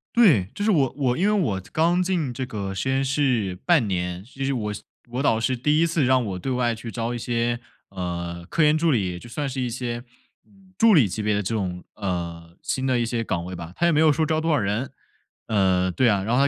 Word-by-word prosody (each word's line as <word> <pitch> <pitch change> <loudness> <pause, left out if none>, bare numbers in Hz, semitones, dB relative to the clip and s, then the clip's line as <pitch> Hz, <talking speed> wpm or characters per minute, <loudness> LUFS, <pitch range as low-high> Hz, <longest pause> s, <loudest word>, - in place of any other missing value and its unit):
对， 150 - +5
就 205 - -4
是 220 - +4
我 140 -8 +2
我 125 -3 +1
因 190 - +1
为 - - +3
我 110 - 0
刚 170 +3 +2
进 170 -9 -1
这 130 +2 -3
个 100 -4 -4
实 130 +8 -2
验 135 +1 +1
室 125 -9 0
半 155 -11 +4
年， 90 -1 -2
这 135 +2 -7
是 140 - 0
我 105 -4 -2 0.4
我 125 +3 -2
导 115 -5 +3
师 130 +2 0
第 150 +5 +2
1 170 - +4
次 160 -3 +1
让 130 -1 +3
我 95 -2 -4
对 130 - -3
外 120 -2 +1
去 115 0 -8
招 115 0 -2
一 - - -3
些， 120 0 -1 0.3
呃， 85 -2 -5
科 165 - 0
研 150 +1 +4
助 165 0 +2
理， 95 -7 0
就 120 - -11
算 145 +3 -3
是 130 0 -3
一 125 - -1
些 120 0 -4 0.7
助 225 -2 +6
理 135 - +6
级 105 +4 -4
别 105 0 +1
的 105 - +1
这 110 +4 -2
种， 90 -3 -3
呃 85 -3 -4
新 130 0 -2
的 130 -2 +2
一 120 - +1
些 115 0 -2
岗 85 -5 -2
位 90 0 -6
吧。 85 0 -8
他 170 - +1
也 170 - +4
没 150 - +3
有 155 -1 +6
说 155 +2 +1
招 155 0 0
多 165 0 0
少 150 - +3
人。 105 +5 -1 0.6
呃， 95 -3 +2
对 125 +7 +2
啊， 100 -3 +2
然 115 +4 -1
后 140 +1 +4
120 Hz, 260 characters per minute, -24 LUFS, 95-140 Hz, 0.7 s, 助